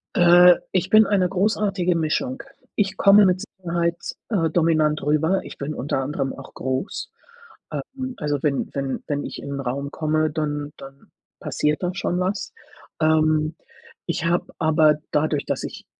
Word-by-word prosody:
Äh, 175 0 +7 0.2
ich 185 -1 0
bin 215 +1 +7
eine 190 -3 +2
großartige 195 -2 +1
Mischung. 170 +12 -1 0.3
Ich 195 -2 0
komme 200 +1 +7
mit 185 0 +2
Sicherheit, 170 -2 -2 0.3
äh, 165 -7 +1
dominant 155 -2 +2
rüber. 160 +6 +2
Ich - - -10
bin 145 +2 -4
unter 135 0 -2
anderem 135 0 -2
auch 135 - -12
groß. 130 +9 -4 0.6
Ähm, 260 -1 -5
also 145 -2 -2
wenn 140 -2 0
wenn 135 -1 -3
wenn 145 -1 -2
ich - - -7
in - - -7
'nen 140 - -4
Raum 140 +3 -3
komme, 155 0 0
dann 150 -1 -3
dann 135 0 -14 0.3
passiert 150 +3 -1
da 180 0 -1
schon 180 -2 -2
was. 190 +3 -2 0.5
Ähm, 155 0 +2 0.5
ich 170 -1 -2
habe 170 +1 +1
aber 155 -2 +4 0.2
dadurch, 150 -1 0
dass - - -2
ich - - -8
160 Hz, 160 wpm, -23 LUFS, 150-185 Hz, 0.6 s, Äh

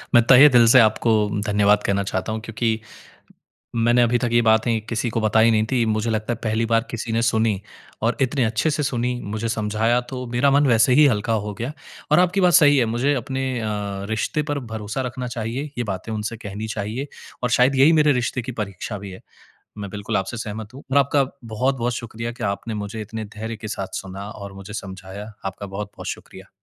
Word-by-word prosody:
मैं 120 - +7
तहे 135 +3 +9
दिल 120 -2 +6
से 125 +3 +7
आपको 110 0 +3 0.3
धन्यवाद 105 0 +3
कहना 100 0 0
चाहता 95 +2 -3
हूँ 110 0 -3
क्योंकि 115 0 -1 1.0
मैंने 120 +1 +3
अभी 120 +1 +2
तक 120 - -1
ये 120 - +5
बातें 110 +1 +3
किसी 115 +1 -1
को 115 - -1
बताई 110 +1 +4
नहीं 110 -1 +2
थीं। 120 -3 +2
मुझे 110 +1 0
लगता 110 +2 -1
है - - -6
पहली 110 0 0
बार 115 0 +2
किसी 115 0 -4
ने 115 - +1
सुनी 110 -3 +1 0.4
और 115 +2 +1
इतने 130 0 +1
अच्छे 115 +8 0
से 150 0 -1
सुनी, 125 -3 -1
मुझे 110 +3 -3
समझाया 110 +2 +1
तो 125 -1 -5
मेरा 125 +4 +2
मन 140 +1 +4
वैसे 120 +1 +4
ही 150 +3 +7
हल्का 115 -1 0
हो 105 0 -5
गया। 120 +7 -4 0.4
और 150 - +6
आपकी 180 +2 +2
बात 180 -1 +4
सही 145 -1 +6
है 125 - +3
मुझे 120 +6 +1
अपने 130 +1 -3 0.2
अ, - - -3 0.4
रिश्ते 110 +7 -1
पर 145 -1 -2
भरोसा 110 +4 -3
रखना 125 0 -5
चाहिए, 120 +2 -4
ये 120 - 0
बातें 95 +4 -6
उनसे 110 +2 -4
कहनी 105 0 -6
चाहिए 110 +6 -4 0.4
और 125 - +1
शायद 130 +2 +4
यही 140 +5 +6
मेरे 150 -1 +5
रिश्ते 125 0 -1
की 125 +2 -6
परीक्षा 100 +1 -5
भी 100 -1 -8
है। 95 - -11 0.6
मैं 100 -1 -5
बिल्कुल 100 +1 -3
आपसे 95 +5 -3
सहमत 110 0 -6
हूँ 135 - -11
और 140 - +3
आपका 140 0 +3 0.2
बहुत-बहुत 120 +2 -1
शुक्रिया 115 0 -5
कि 120 0 -9
आपने 100 +3 -2
मुझे 110 +2 -6
इतने 110 +1 -6
धैर्य 110 +1 -4
के 110 - -7
साथ 100 -3 -5
सुना 95 +1 -8
और 100 -3 -9
मुझे 100 +2 -10
समझाया। 100 +1 -8
आपका 100 +1 -5
बहुत-बहुत 100 +1 -7
शुक्रिया। 95 +1 -8
115 Hz, 210 wpm, -22 LUFS, 105-125 Hz, 1.0 s, तहे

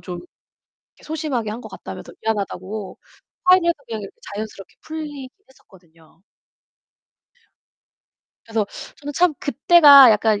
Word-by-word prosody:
좀 180 -2 -7 0.8
소심하게 285 -8 -3
한 225 +3 -6
것 - - -10
같다면서 - - -10
미안하다고 205 -1 -4 0.5
화해를 365 -1 +5
해서 340 - +3
그냥 220 -2 -5 0.3
자연스럽게 210 -2 -8
풀리긴 295 -4 -7 0.2
했었거든요. 165 -8 -23 2.2
그래서 220 -2 -2 0.3
저는 290 0 -7
참 345 -1 +2
그때가 285 -3 +7
약간 215 0 +2
230 Hz, 270 characters per minute, -21 LUFS, 205-295 Hz, 2.2 s, 그때가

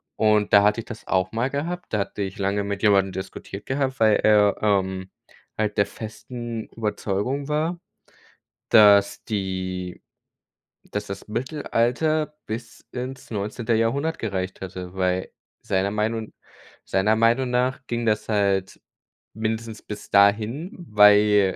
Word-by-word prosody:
Und 105 -1 +2
da 100 -1 +8
hatte 105 +3 +3
ich - - -16
das 115 -2 -9
auch 95 -1 +1
mal 115 +4 0
gehabt, 170 +2 -4
da 105 - +2
hatte 100 +1 -3
ich 95 +2 -6
lange 100 +1 0
mit 100 -1 -4
jemandem 100 -2 +4
diskutiert 95 +1 -7
gehabt, 135 0 -1
weil 110 -1 +5
er, 105 -1 +4
ähm, 95 -2 0 0.5
halt 105 -1 -1
der 100 - +4
festen 115 +2 -7
Überzeugung 110 +5 -2
war, 160 +3 -1 0.9
dass 100 -2 +6
die 95 -3 -3 0.9
dass 105 0 -3
das 100 0 -7
Mittelalter 150 +5 0
bis 115 +1 -7
ins 130 +1 -6
19. 110 +3 -2
Jahrhundert 140 +9 0
gereicht 95 -4 -3
hätte, 90 -1 -7
weil 95 -1 -1 0.3
seiner 95 +1 0
Meinung 110 +1 -2 0.5
seiner 100 +3 +2
Meinung 120 +3 +2
nach 125 +2 +1
ging 120 -1 -2
das 105 -1 0
halt 100 -3 0 0.5
mindestens 110 0 -3
bis 105 -1 -8
dahin, 105 - +3 0.2
weil, 105 -2 +5
105 Hz, 135 wpm, -24 LUFS, 100-120 Hz, 0.9 s, da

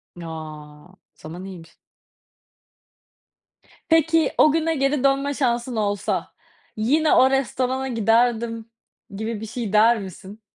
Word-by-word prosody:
Ya 170 -1 -9
o 155 +2 -10 0.2
zaman 175 +4 -9
iyiymiş. 175 -4 -11 2.1
Peki, 325 0 +3
o 305 - +6
güne 325 0 0
geri 275 0 0
dönme 275 +1 +1
şansın 240 -2 -1
olsa, 205 -2 -2 0.4
yine 295 +8 +2
o 260 - +5
restorana 265 0 -1
giderdim 230 0 +1 0.5
gibi 220 +1 -4
bir - - -5
şey 220 -2 -5
der 225 +2 +5
misin? 195 +3 -10
230 Hz, 115 wpm, -22 LUFS, 200-270 Hz, 2.1 s, o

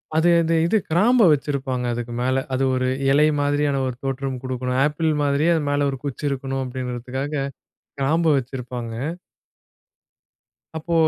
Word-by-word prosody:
அது 160 +2 +4
அந்த 165 0 +1
இது 195 +6 +3
கிராம்ப 220 +9 +4
வெச்சுருப்பாங்க 135 -3 -1
அதுக்கு 120 0 -5
மேல, 130 +1 +1
அது 130 +1 +1
ஒரு 130 0 0 0.2
இலை 145 +2 +5 0.2
மாதிரியான 145 -1 +1
ஒரு 130 - -4
தோற்றம் 135 -1 -3
குடுக்கணும். 130 0 -2
ஆப்பிள் 155 +2 0
மாதிரியே 145 +3 +2
அது 160 - 0
மேல 145 0 +1
ஒரு 135 - -3
குச்சி 140 +1 -4
இருக்கணும் 135 -1 -3
அப்டிங்கிறதுக்காக, 130 +2 -4 0.7
கிராம்ப 160 +5 +1
வெச்சுருப்பாங்க. 125 -2 -4 1.8
அப்போ 160 +2 -3
135 Hz, 135 wpm, -22 LUFS, 130-150 Hz, 1.8 s, இலை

